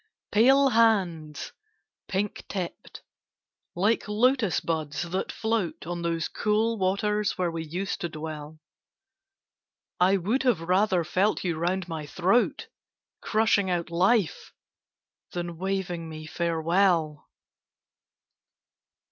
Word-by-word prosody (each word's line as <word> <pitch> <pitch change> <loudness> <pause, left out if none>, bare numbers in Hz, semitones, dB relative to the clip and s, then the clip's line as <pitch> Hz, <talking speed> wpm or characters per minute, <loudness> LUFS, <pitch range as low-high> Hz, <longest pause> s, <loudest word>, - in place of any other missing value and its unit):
Pale 270 +5 +5
hands, 185 - +1 0.6
pink 200 +1 -2
tipped, 185 -4 -6 0.7
like 205 +7 +1
Lotus 225 -1 +2
buds 155 -3 -2
that 175 +2 -3
float 220 -9 -2
On 175 +1 -4
those 165 -1 -1
cool 220 +1 0
waters 205 +2 0
where 180 -2 0
we 165 -1 -4
used 180 +5 -4
to 175 - -2
dwell, 155 -1 -7 1.4
I 185 +2 +4
would 210 +9 0
have 245 -10 +2
rather 185 +1 +2
felt 185 +6 +1
you 175 -3 -1
round 175 +3 -1
my 160 -3 -5
throat, 190 +10 +1 0.5
Crushing 215 -3 +2
out 175 -2 -1
life, 185 +1 +1 0.8
than 175 -2 -4
waving 185 -3 -2
me 155 0 -8
farewell! 165 -1 +1
180 Hz, 105 wpm, -27 LUFS, 165-210 Hz, 1.4 s, Pale